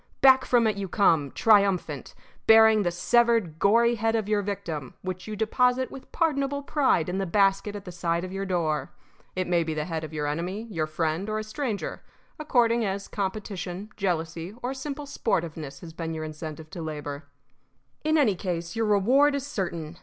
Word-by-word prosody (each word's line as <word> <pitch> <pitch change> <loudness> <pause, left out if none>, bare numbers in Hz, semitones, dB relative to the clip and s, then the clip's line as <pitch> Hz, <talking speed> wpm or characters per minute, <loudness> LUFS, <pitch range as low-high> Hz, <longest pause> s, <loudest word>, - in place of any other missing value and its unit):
Back 265 -1 +6
from 240 -2 +3
it 215 -2 +1
you 200 -1 -3
come, 165 -7 +3
triumphant, 200 - +2 0.3
bearing 220 -1 +7
the 180 - +1
severed, 225 -2 +2
gory 235 +5 +4
head 225 0 0
of 220 -3 -1
your 210 -1 +2
victim, 165 -9 -5
which 185 +1 -5
you 215 - -4
deposit 250 +4 +1
with 265 - -11
pardonable 285 -3 0
pride 275 - +2
in 180 +2 -2
the 195 - -1
basket 195 +2 +2
at 200 - -7
the 180 - -7
side 170 0 -1
of 185 - -6
your 195 0 -3
door. 160 -7 -1 0.4
It 185 0 0
may 175 -1 +2
be 160 -1 -3
the 150 0 -2
head 165 -3 -3
of 155 - -6
your 150 -1 -3
enemy, 175 +8 -3
your 160 -5 -1
friend, 160 +5 -2
or 215 - -1
a 215 - -2
stranger, 215 -1 -4 0.4
according 240 -6 +2
as 195 -1 -2
competition, 195 -1 -4
jealousy, 170 -1 -2
or 250 +2 -1
simple 285 +2 -5
sportiveness 160 - -3
has 165 -2 -10
been 165 0 -4
your 155 - -4
incentive 155 0 -7
to 175 - -6
labor. 150 -2 -5 0.8
In 310 +1 +2
any 260 -9 +4
case, 175 -1 -4
your 225 -1 0
reward 255 +9 +4
is 280 -1 -3
certain. 170 - -4
195 Hz, 185 wpm, -26 LUFS, 165-225 Hz, 0.8 s, bearing